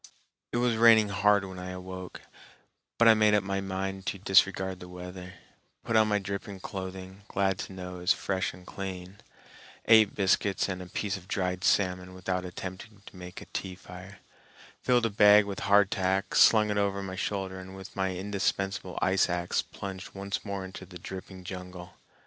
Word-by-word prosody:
It - - -1
was 120 -2 +2
raining 110 -2 +6
hard 100 0 +3
when 95 -1 -8
I 90 0 -6
awoke, 90 0 -8 0.8
but 115 - +5
I 115 - +9
made 105 -1 +4
up 105 - +2
my 100 0 -2
mind 95 0 -4
to 100 - -1
disregard 95 -1 +3
the 90 - -10
weather, 90 +1 -9 0.5
put 115 - -2
on 110 -1 +5
my 105 -1 +2
dripping 100 0 -5
clothing, 95 +1 -7
glad 95 -1 0
to - - -6
know 90 -1 -7
it - - -8
was 90 - +2
fresh 95 -1 -2
and 90 0 -14
clean; 95 0 -7 0.7
ate 110 -2 +6
biscuits 100 0 +2
and 95 -2 -4
a 90 - -8
piece 100 +2 -2
of 90 -1 -14
dried 90 -2 -2
salmon 90 -2 +1
without 90 0 -2
attempting 95 +3 -8
to - - -13
make 90 0 -9
a - - -10
tea 95 -1 -4
fire; 90 +2 -11 0.6
filled 125 -2 +3
a 115 - 0
bag 105 0 +7
with 100 -1 -5
hardtack, 100 -1 +2
slung 105 -2 +6
it 105 - +1
over 100 -1 0
my 95 -1 -5
shoulder, 95 -1 -3
and 95 +1 -10
with 95 0 -10
my 95 -1 -1
indispensable 95 -1 -2
ice 95 0 +3
axe 85 0 0
plunged 95 -1 -8
once 100 +1 -4
more 100 -2 -4
into 95 0 -9
the 90 -1 -10
dripping 95 +1 -9
jungle. 90 -1 -8
95 Hz, 185 wpm, -29 LUFS, 90-100 Hz, 0.8 s, I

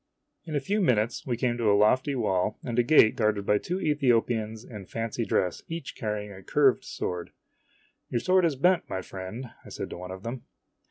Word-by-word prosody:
In 155 -2 -4
a - - +3
few 205 +10 0
minutes 120 - +1
we 120 -2 -1
came 120 0 0
to 115 -3 +2
a 100 - +5
lofty 130 +7 +3
wall, 105 -4 0
and 120 -2 -1
a - - +8
gate 120 -2 +5
guarded 105 -4 +1
by 105 0 +3
two 180 +2 -3
Ethiopians 120 - +1
in 105 -6 -9
fancy 115 0 -3
dress, 90 -4 0
each 165 -3 -6
carrying 105 -2 -3
a 95 -1 -10
curved - - +3
sword. 90 -1 -4 0.4
" - - -38
Your 120 - 0
sword 185 +7 +3
is 165 -4 +2
bent, 175 +6 +2
my 95 -1 -3
friend," 95 +8 -7
I - - -12
said - - -6
to - - -6
one 90 +1 -8
of 95 +1 -8
them. 120 +2 -5
115 Hz, 210 wpm, -27 LUFS, 105-135 Hz, 0.4 s, a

